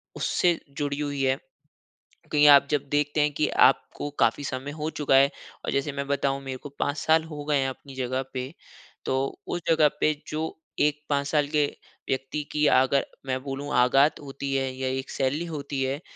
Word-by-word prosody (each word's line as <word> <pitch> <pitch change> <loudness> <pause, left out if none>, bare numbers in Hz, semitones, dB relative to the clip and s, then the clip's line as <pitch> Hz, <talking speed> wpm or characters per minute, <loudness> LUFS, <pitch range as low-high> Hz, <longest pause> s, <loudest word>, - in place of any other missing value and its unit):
उससे 175 -2 +1 0.2
जुड़ी 145 -1 -2
हुई 145 -2 -2
है। 130 0 +2 1.0
कहीं 150 -1 +5
आप 140 -1 +8
जब 145 -1 0
देखते 145 +1 +1
हैं 150 0 +2
कि 150 - +1 0.2
आपको 135 +2 -3
काफ़ी 115 +5 +2
समय 135 +1 -4
हो 150 - -2
चुका 145 -4 +2
है 135 +1 +6 0.3
और - - -1
जैसे 140 +1 0
मैं 140 0 -4
बताऊँ, 140 -1 0
मेरे 135 -1 -5
को 145 - -7
5 145 +1 0
साल 160 0 +3
हो 150 -2 -7
गए 145 -1 +2
हैं 135 -1 +1
अपनी 135 +1 -9
जगह 130 0 -2
पे, 130 +2 -4 0.5
तो 135 +1 -1
उस 175 - -3
जगह 160 -2 +5
पे 155 - +4 0.2
जो 155 +1 -3 0.2
एक 150 0 +2
5 140 -1 +1
साल 150 0 +2
के 150 -1 +2 0.4
व्यक्ति 135 +3 -2
की, 150 0 +2
अगर 130 +1 +4 0.2
मैं 130 0 -2
बोलूँ, 140 +1 -5
आगात 135 +4 +4
होती 140 -1 -5
है 135 -1 0
या 130 0 -2
एक 130 0 -3
सैलरी 140 +5 -1
होती 140 -4 -4
है 135 +2 -1
140 Hz, 195 wpm, -26 LUFS, 135-150 Hz, 1.0 s, आप